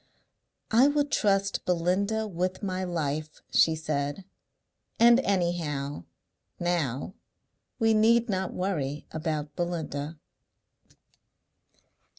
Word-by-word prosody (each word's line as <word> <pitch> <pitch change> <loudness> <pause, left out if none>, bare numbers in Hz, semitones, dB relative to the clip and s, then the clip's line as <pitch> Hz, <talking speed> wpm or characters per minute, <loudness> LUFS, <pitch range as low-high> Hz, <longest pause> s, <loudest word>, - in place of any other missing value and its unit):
"I 240 +5 +6
would 290 0 +1
trust 195 -1 +1
Belinda 185 +5 +1
with 185 +1 -3
my 185 -1 -2
life," 155 -3 -3
she 160 - +5
said. 150 +3 -3 0.7
"And 235 +1 +7
anyhow 170 - -1 0.5
now 170 -4 -1 0.6
we 225 -2 +3
need 230 +2 +4
not 190 -3 -1
worry 150 -7 -2
about 155 -2 -3
Belinda." 160 -3 -3
175 Hz, 90 wpm, -28 LUFS, 155-200 Hz, 0.7 s, And